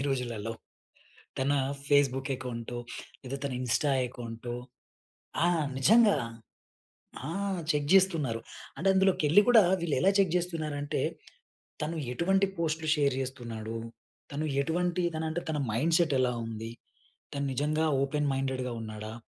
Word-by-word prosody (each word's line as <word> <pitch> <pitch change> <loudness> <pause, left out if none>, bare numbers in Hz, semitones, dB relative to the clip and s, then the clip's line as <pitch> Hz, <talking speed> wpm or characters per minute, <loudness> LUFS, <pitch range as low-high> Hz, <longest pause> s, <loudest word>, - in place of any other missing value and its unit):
ఈ - - -1
రోజులల్లో 120 -4 -2 0.9
తన 135 +2 +2 0.4
ఫేస్‌బుక్ 135 -1 +3
అకౌంటో 120 -1 -5 0.4
లేదా 135 +2 -4
తన 140 - -2
ఇన్స్టా 125 +4 +1 0.2
అకౌంటో 120 -1 -7 0.9
ఆ! - - +5 0.3
నిజంగా 215 - +6 1.1
ఆ! - - -4 0.4
చెక్ 145 -1 0
జేస్తున్నారు. 165 -12 +3 0.4
అంటే 195 - -1
అందులోకెళ్లి 190 -2 +5
గూడా 225 -4 +8 0.2
వీళ్ళెలా 170 +4 +3
చెక్ 185 -4 +3
జేస్తున్నారంటే 155 -5 -2 0.8
తను 165 +2 -2 0.2
ఎటువంటి 190 +8 +3
పో‌స్ట్‌లు 160 -1 -1
షేర్ 140 -3 +2
చేస్తున్నాడు. 115 -4 -5 0.5
తను 150 +2 -2 0.2
ఎటువంటి 175 +4 0
తన 160 - -2
అంటే 170 +2 -2
తన 155 - 0
మైండ్ 155 +9 +2
సెట్ 170 -4 +2
ఎలా 125 -1 +2
ఉంది. 115 0 -6 0.6
తను 140 0 -2
నిజంగా 155 +4 +1 0.2
ఓపెన్ 145 +1 0
మైండెడ్‌గా 130 -2 -2
ఉన్నాడా? 110 0 -6
140 Hz, 120 wpm, -29 LUFS, 125-165 Hz, 1.1 s, గూడా